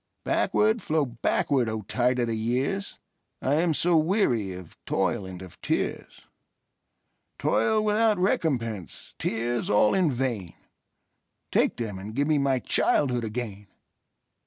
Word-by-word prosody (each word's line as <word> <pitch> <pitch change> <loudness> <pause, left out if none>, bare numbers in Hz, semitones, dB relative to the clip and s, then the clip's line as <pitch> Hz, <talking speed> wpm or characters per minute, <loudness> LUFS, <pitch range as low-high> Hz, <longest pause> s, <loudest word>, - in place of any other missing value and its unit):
Backward, 220 +1 +2
flow 155 -2 +1
backward, 125 +1 0
O 110 -1 -4
tide 125 +5 +1
of 120 - +1
the 115 - -2
years!I 135 - -3
am 170 -3 +1
so 175 +3 +3
weary 155 - +1
of 90 -2 -11
toil 95 +1 0
and 90 -1 -8
of 90 - -14
tears,—Toil 215 - -3
without 215 0 +3
recompense, 120 - -1
tears 120 +1 -1
all 105 +1 +4
in 180 -6 +2
vain,—Take 120 -8 -4
them, 105 -5 -4
and 105 +3 -8
give 140 +2 +1
me 155 -2 +3
my 135 -1 +2
childhood 125 -1 +1
again! 105 -3 -5
125 Hz, 120 wpm, -26 LUFS, 110-160 Hz, -, all